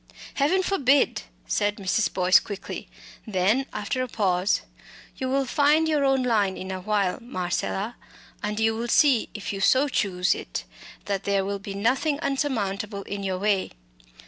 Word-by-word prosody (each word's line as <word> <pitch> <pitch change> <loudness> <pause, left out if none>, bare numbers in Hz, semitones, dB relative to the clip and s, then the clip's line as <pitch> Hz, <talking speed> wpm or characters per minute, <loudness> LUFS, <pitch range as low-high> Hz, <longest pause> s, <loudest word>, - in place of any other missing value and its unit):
"Heaven 345 +7 +2
forbid!" 285 -8 +2 0.2
said 205 - 0
Mrs. 200 +2 0
Boyce, 185 0 +5
quickly; 200 -2 -7 0.4
then, 215 +7 +1
after 210 +5 -2
a 255 - -1
pause: 190 -4 +1 0.6
"You 260 -2 -2
will 270 +1 +1
find 295 +5 +3
your 300 -2 +2
own 270 -1 +3
line 210 -6 +1
in 190 0 -6
a 190 - -3
little 185 - -11
while, 200 -1 +1
Marcella, 200 0 -3 0.4
and 210 0 -2
you 225 0 +2
will 235 +2 -3
see, 255 -1 +4
if 205 -1 -4
you 195 - -4
so 265 +8 +4
choose 180 -8 +1
it, - - -5 0.4
that 200 -1 -2
there 200 -1 +1
will 200 0 -3
be 200 0 -7
nothing 260 +8 +1
unsurmountable 210 -8 -2
in 200 +1 -5
your 190 -2 -2
way. 200 0 0
210 Hz, 165 wpm, -25 LUFS, 195-265 Hz, 0.6 s, Boyce